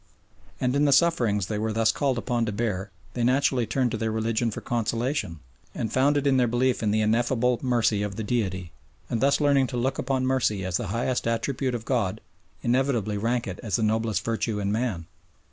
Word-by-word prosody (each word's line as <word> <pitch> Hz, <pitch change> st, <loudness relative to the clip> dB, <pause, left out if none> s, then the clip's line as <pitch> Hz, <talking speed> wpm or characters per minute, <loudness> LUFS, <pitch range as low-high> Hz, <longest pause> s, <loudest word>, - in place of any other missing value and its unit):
And 125 Hz, +1 st, 0 dB
in 145 Hz, +1 st, +3 dB
the 140 Hz, -, +3 dB
sufferings 120 Hz, -, +3 dB
they 105 Hz, +1 st, -3 dB
were 110 Hz, +1 st, -1 dB
thus 110 Hz, 0 st, +3 dB
called 135 Hz, -4 st, 0 dB
upon 120 Hz, -1 st, -1 dB
to -, -, -1 dB
bear 105 Hz, -3 st, -2 dB, 0.2 s
they 120 Hz, -, -2 dB
naturally 130 Hz, -1 st, +2 dB
turned 125 Hz, +1 st, 0 dB
to -, -, -2 dB
their 110 Hz, 0 st, -1 dB
religion 115 Hz, +1 st, 0 dB
for 105 Hz, -, -5 dB
consolation, 115 Hz, -, -2 dB, 0.3 s
and 110 Hz, -1 st, -3 dB
found 140 Hz, +3 st, +3 dB
it 145 Hz, -, -1 dB
in 135 Hz, -2 st, +4 dB
their 125 Hz, -1 st, +3 dB
belief 120 Hz, +2 st, +1 dB
in 110 Hz, -, +1 dB
the 110 Hz, +1 st, +2 dB
ineffable 120 Hz, +3 st, +1 dB
mercy 120 Hz, -5 st, +1 dB
of 105 Hz, -1 st, -3 dB
the 110 Hz, -, -4 dB
Deity, 95 Hz, -6 st, -2 dB, 0.4 s
and 115 Hz, -, 0 dB
thus 140 Hz, +1 st, +3 dB
learning 140 Hz, -3 st, +3 dB
to 125 Hz, -, -4 dB
look 130 Hz, +3 st, -1 dB
upon 130 Hz, 0 st, 0 dB
mercy 115 Hz, -7 st, +1 dB
as 90 Hz, -1 st, 0 dB
the 120 Hz, -, -4 dB
highest 120 Hz, +5 st, -1 dB
attribute 125 Hz, +2 st, -1 dB
of 115 Hz, -1 st, -6 dB
God 115 Hz, -8 st, 0 dB, 0.4 s
inevitably 120 Hz, -5 st, +1 dB
rank 120 Hz, +3 st, 0 dB
it 95 Hz, -, -6 dB
as 110 Hz, -6 st, -1 dB
the 110 Hz, -, 0 dB
noblest 110 Hz, -2 st, 0 dB
virtue 115 Hz, -1 st, -1 dB
in 100 Hz, 0 st, -1 dB
man. 110 Hz, -7 st, -1 dB
115 Hz, 210 wpm, -26 LUFS, 110-130 Hz, 0.4 s, in